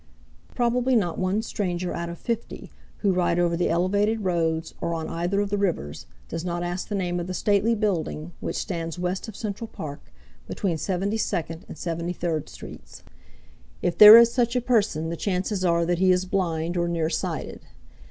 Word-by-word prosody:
Probably 245 +1 +2
not 180 -7 0
one 190 +4 0
stranger 180 -5 -2
out 170 0 -4
of 170 - -7
fifty 230 +3 -5 0.3
who 200 -3 +2
ride 175 -1 +1
over 175 -1 +2
the 175 - 0
elevated 200 +6 +1
roads 165 -3 -1
or 170 - -1
on 160 -1 -4
either 175 +4 -1
of 200 -1 -3
the 205 - 0
rivers 165 - -2 0.2
does 165 0 -5
not 175 -1 -2
ask 175 +1 -3
the 210 - -3
name 175 -2 -1
of 175 - -4
the 185 - -4
stately 210 +4 +2
building 175 -6 -2
which - - -4
stands 165 -3 -4
west 180 +3 -2
of 220 - -8
Central 215 +1 -5
Park, 145 -8 -8 0.4
between 175 -6 -2
Seventy 195 +5 -1
second 165 -5 -3
and - - -9
Seventy 170 0 -3
third 165 -4 -3
streets. - - -11 0.8
If 175 - +1
there 215 +1 +12
is 235 0 +7
such 240 -1 +1
a - - +3
person 210 -10 +1
the 170 - -3
chances 185 +3 -2
are 170 -1 +2
that 175 0 0
he 185 0 +4
is 180 0 +2
blind 175 -2 -1
or 170 0 +1
nearsighted. 165 -1 -3
180 Hz, 185 wpm, -25 LUFS, 170-205 Hz, 0.8 s, there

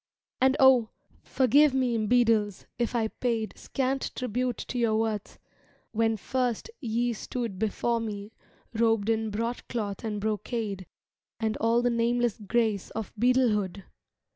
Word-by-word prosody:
And 265 +1 +4
O! 255 -4 +6 0.3
forgive 275 +2 +4
me, 255 -3 +1
Beadles, 225 -4 +2
if 240 0 0
I 225 -2 +1
paid 230 -3 -2
Scant 270 0 -2
tribute 250 -1 -1
to 245 - -4
your 225 -2 +2
worth, 220 -2 -2 0.5
when 225 0 +1
first 250 - -2
ye 240 -1 0
stood 230 -2 -4
Before 230 +2 0
me 210 -1 -5 0.4
robed 225 -2 +2
in 220 -1 0
broadcloth 225 -1 -3
and 215 -2 -3
brocade 210 -2 -3 0.5
And 220 -1 0
all 230 +2 +2
the 245 - +2
nameless 235 -1 +1
grace 215 -1 0
of 220 -3 -6
Beadlehood! 215 -5 +2
230 Hz, 130 wpm, -28 LUFS, 215-245 Hz, 0.5 s, O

